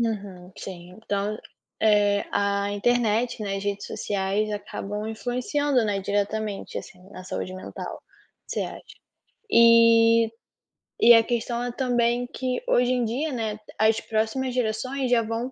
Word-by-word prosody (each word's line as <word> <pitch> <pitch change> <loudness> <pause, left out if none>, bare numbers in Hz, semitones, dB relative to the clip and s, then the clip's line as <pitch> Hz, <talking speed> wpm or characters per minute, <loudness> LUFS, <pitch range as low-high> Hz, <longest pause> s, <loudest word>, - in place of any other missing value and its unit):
Aham, 195 -5 -4
sim, 180 -2 -8
então, 205 -1 -2 0.4
eh, 205 -2 +3
a 200 0 0
internet, 235 +1 +1
né, 195 -1 -2
as 195 - -5
redes 200 0 -3
sociais 200 +1 -1
acabam 210 0 -5
influenciando, 250 +3 0
né, 200 -2 -1
diretamente, 205 +1 -2
assim, 180 - -11
na 185 - -9
saúde 185 0 -5
mental, 185 - -7 0.4
você - - -3
acha. - - -7 0.7
E 230 - +6 0.7
e 235 +1 +9
a 225 0 +7
questão 240 0 -2
é 245 - -3
também 245 -1 +1
que 255 0 -3
hoje 250 - +3
em 245 -2 +1
dia, 275 +7 -2
né, 220 -4 -3 0.2
as 220 +1 +4
próximas 225 +4 -1
gerações 250 +3 -1
já 240 -2 +4
vão 230 +3 -3
220 Hz, 140 wpm, -25 LUFS, 205-245 Hz, 0.7 s, e